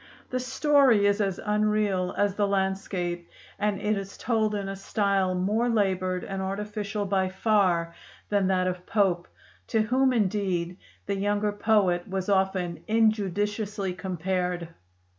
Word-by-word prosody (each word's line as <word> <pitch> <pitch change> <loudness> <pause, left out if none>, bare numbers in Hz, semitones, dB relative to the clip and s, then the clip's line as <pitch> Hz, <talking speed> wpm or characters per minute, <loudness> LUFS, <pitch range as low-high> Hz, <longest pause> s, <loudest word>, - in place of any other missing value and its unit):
The 255 - 0
story 260 -4 +3
is 205 +1 +2
as 195 -3 -1
unreal 210 -3 +1
as 205 -1 +2
the 205 0 +1
landscape, 190 -3 -2 0.3
and 205 -2 0
it 210 +1 0
is 195 0 -6
told 220 -3 0
in 200 -1 -3
a 195 - -4
style 195 -1 0
more 210 +6 +1
labored 185 -4 0
and 195 -1 -4
artificial 205 +1 -3
by 190 -1 +1
far 185 -4 +1 0.4
than 200 -2 +2
that 185 -1 +2
of 180 0 -3
Pope, 185 -5 +1 0.4
to 220 - +2
whom 260 +4 +2
indeed 185 -6 0 0.3
the 200 -1 -2
younger 205 +1 0
poet 205 -4 +2
was 190 0 -3
often 190 -4 0
injudiciously 210 -2 0
compared. 180 -2 -2
200 Hz, 140 wpm, -27 LUFS, 185-210 Hz, 0.4 s, story